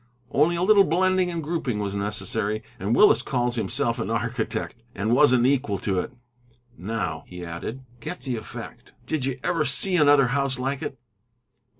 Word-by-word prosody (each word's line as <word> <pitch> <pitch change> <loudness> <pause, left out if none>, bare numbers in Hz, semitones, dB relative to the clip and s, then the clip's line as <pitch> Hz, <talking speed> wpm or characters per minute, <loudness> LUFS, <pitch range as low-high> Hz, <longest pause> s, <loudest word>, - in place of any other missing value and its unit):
Only 155 +5 +3
a 170 - 0
little 200 0 +6
blending 185 +1 +2
and 170 -2 -3
grouping 150 -7 -2
was 100 -1 -2
necessary, 105 +1 -2 0.2
and 100 +5 0
Willis 210 - +6
calls 125 -2 -1
himself 115 +1 -1
an 95 - -2
architect, 115 0 -2
and 105 +4 0
wasn't 125 -2 +5
equal 130 -7 +1
to 95 0 -1
it. - - -4 0.6
Now," 90 -6 -3
he 90 -1 -8
added, 85 +10 -6 0.2
"get 180 - -6
the 130 -3 -3
effect. 110 - -9
Did 140 0 -2
you 135 -1 -3
ever 165 -1 +1
see 165 +7 0
another 145 -4 +5
house 135 0 0
like 135 +2 -2
it?" 135 - -5
125 Hz, 170 wpm, -25 LUFS, 110-150 Hz, 0.6 s, little